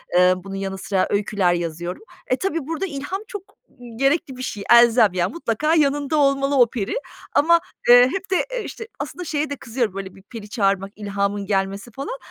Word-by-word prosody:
eee, 180 0 +6
bunun 195 +1 -8
yanı 195 0 -4
sıra 190 0 0
öyküler 200 -3 +1
yazıyorum. 175 - -4 0.2
E, 255 - +2
tabii 330 -6 -2
burada 330 +4 -2
ilham 330 +4 -5
çok, 410 -5 -7 0.3
ımm, 240 -2 -13
gerekli 275 0 +1
bir - - -7
şey, 210 -5 -4
elzem, 235 -4 +6
yani, 180 -1 -1
mutlaka 305 0 0
yanında 290 0 +1
olmalı 275 0 +2
o 245 -3 +6
peri 230 - -3 0.4
ama, 335 +3 +5 0.3
eee, 245 +1 +9
hep 385 0 -4
de, 375 - +2
e, 480 - -2
işte, 455 - -8
aslında 360 - -5
şeye 300 -1 -1
de 285 - -3
kızıyorum, 230 -4 -2
böyle, 195 -1 -7
bir 190 - -15
peri 210 -1 -10
çağırmak, 195 -2 0
ilhamın 200 -1 -2
gelmesi, 195 +3 -2
falan. 350 - -6
240 Hz, 190 wpm, -22 LUFS, 195-290 Hz, 0.4 s, eee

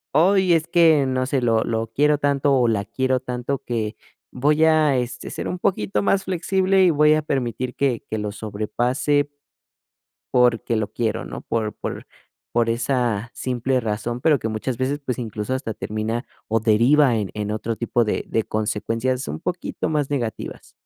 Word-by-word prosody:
"Ay, 185 +3 +4
es 165 -1 +2
que 160 -5 +5
no 130 0 0
sé, 135 -1 0
lo 115 -2 +2
lo 115 0 -1
quiero 150 +1 +3
tanto 140 0 +2
o 125 -2 +3
la 105 -3 +1
quiero 130 +5 0
tanto 125 +2 -3
que 110 -3 -3 0.4
voy 150 +5 +3
a, 155 -4 +4
este, 125 0 -4
ser - - -5
un 180 - -4
poquito 105 - 0
más 195 - +2
flexible 190 +1 +2
y 180 - +6
voy 150 -1 +5
a 155 - +2
permitir 125 -3 -2
que 130 -5 0
que 110 - -2
lo 105 -1 -3
sobrepase 120 +7 0 1.1
porque 120 -2 +3
lo 110 -2 -1
quiero, 115 -2 -1
¿no?, - - -7
por 110 -2 -2
por - - -6 0.5
por 115 -1 +2
esa 120 -2 0
simple 130 +1 -1
razón, 115 +2 -3
pero 150 +1 +4
que 110 - -3
muchas 110 +3 -3
veces, 135 +4 -1
pues, 125 -2 -2
incluso 110 +1 -3
hasta 130 -4 -3
termina 110 +3 -3 0.2
o 110 +1 +1
deriva 120 +5 +4
en 105 -3 -2
en 105 -1 -3
otro 110 +1 -2
tipo 120 +1 +1
de 105 - -1
de 110 - 0
consecuencias, 115 +4 -1
un 75 +2 -5
poquito 175 -2 -3
más 150 -3 0
negativas. 120 -6 -4
125 Hz, 175 wpm, -22 LUFS, 110-145 Hz, 1.1 s, y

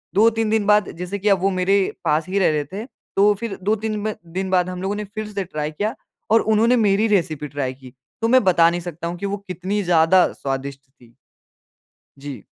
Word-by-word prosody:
2-3 225 +1 +3
दिन 220 -1 +1
बाद 210 -2 +4
जैसे 180 +3 -4
की 205 +2 +1
अब 195 - +4
वो 195 - +3
मेरे 185 +1 +1 0.3
पास 155 0 +1
ही 200 - +1
रह 190 - +4
रहे 150 -1 -1
थे। 215 +4 -5 0.3
तो 205 +1 +5
फिर 230 -4 -4
2-3 215 +1 -1 0.2
दिन 190 +1 -2
बाद 180 -1 +2
हम 180 0 -6
लोगों 195 +2 -2
ने 210 - -4
फिर 215 +1 -6
से 205 -2 -3
ट्राई 150 -4 -4
किया, 210 +8 -2 0.4
और 225 - +6
उन्होंने 220 +3 +3
मेरी 210 -1 +3
रेसिपी 165 -8 0
ट्राई 135 -2 -3
की। 130 -1 -15 0.3
तो 225 - +2
मैं 255 0 +5
बता 170 -3 +5
नहीं 175 +1 -3
सकता 170 -1 -6
हूँ 175 +1 -5
कि 200 - -5
वो 200 +1 -2
कितनी 190 +4 -2
ज़्यादा 175 +1 +4
स्वादिष्ट 135 0 -4
थी। 120 -4 -23 1.0
जी। 135 -6 -8
190 Hz, 210 wpm, -21 LUFS, 160-210 Hz, 1.0 s, और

